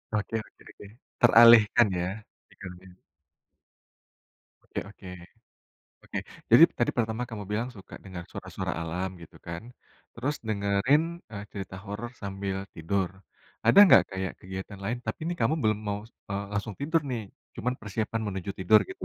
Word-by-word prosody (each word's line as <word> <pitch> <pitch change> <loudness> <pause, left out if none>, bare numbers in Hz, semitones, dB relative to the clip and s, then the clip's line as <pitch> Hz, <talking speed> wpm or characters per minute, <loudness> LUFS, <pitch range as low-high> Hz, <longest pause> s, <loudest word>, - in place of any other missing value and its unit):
Oke 105 +2 -2
oke - - -26
oke. 100 - -13 0.3
Teralihkan, 115 -1 +8
ya, 90 - -1 0.4
pikirannya. 90 -1 -12 1.7
Oke - - -5
oke. 100 -2 -13 1.0
Oke, - - -5 0.3
jadi - - +10
tadi - - +2
pertama 110 0 0
kamu 110 -3 -6
bilang 110 +4 -1
suka 95 - -12
dengar 95 -3 -7
suara-suara - - -5
alam 90 +3 -2
gitu 80 - -14
kan, 85 +2 -5 0.5
terus 135 +6 -2
dengerin, 100 +8 +2 0.3
eee, 100 -2 -6
cerita 95 -2 -7
horor 105 +4 -5
sambil 95 -1 -3 0.2
tidur. 90 +3 -1 0.6
Ada - - +6
nggak 95 - +8
kayak 95 -1 -2
kegiatan 95 +2 -7
lain 120 +4 -1
tapi 110 - -3
nih 175 - -1
kamu 115 +7 +3
belum 110 -1 +2
mau, 100 0 -1 0.3
eee, 100 +1 -2
langsung 100 +1 -2
tidur 160 +3 +2
nih, 120 -3 -2 0.3
cuma 125 - -1
persiapan 110 +1 -3
menuju 95 0 -4
tidur 105 +3 +6
gitu. - - -8
100 Hz, 145 wpm, -28 LUFS, 95-115 Hz, 1.7 s, jadi